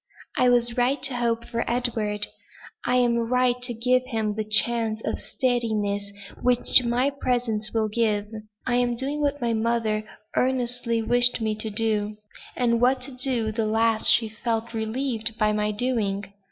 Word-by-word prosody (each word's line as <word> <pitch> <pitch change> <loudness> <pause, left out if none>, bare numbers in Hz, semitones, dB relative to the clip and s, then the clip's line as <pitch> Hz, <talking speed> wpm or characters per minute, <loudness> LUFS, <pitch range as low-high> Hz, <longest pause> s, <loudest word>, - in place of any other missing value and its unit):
"I 250 - +4
was 240 -1 +2
right 250 +4 +2
to 270 -2 +2
hope 235 -1 0
for 230 0 -2
Edward; 220 -4 -1 0.6
I 250 - +2
am 240 -1 +3
right 250 0 +2
to 250 0 -2
give 250 +3 +2
him 220 -4 -1
the 215 +1 -2
chance 220 +1 +1
of - - -2
steadiness 215 -6 -1 0.3
which 250 +1 +5
my 245 +4 +1
presence 240 -6 -1
will 220 -1 +1
give. 215 -1 0 0.4
I 245 -1 +1
am 245 -1 +1
doing 275 +4 -3
what 290 0 0
my 235 -3 0
mother 220 -1 0 0.3
earnestly 245 -2 0
wished 245 +2 +3
me 220 -1 0
to 215 +1 -4
do; 210 -1 -1 0.4
and 235 -2 +1
what 255 +1 +3
to 250 -4 0
the 220 0 -1
last 225 0 +2
she 230 - +5
felt 225 +1 -3
relieved 225 0 -3
by 215 -1 +2
my 210 0 0
doing. 205 -3 -2
235 Hz, 160 wpm, -25 LUFS, 215-245 Hz, 0.6 s, which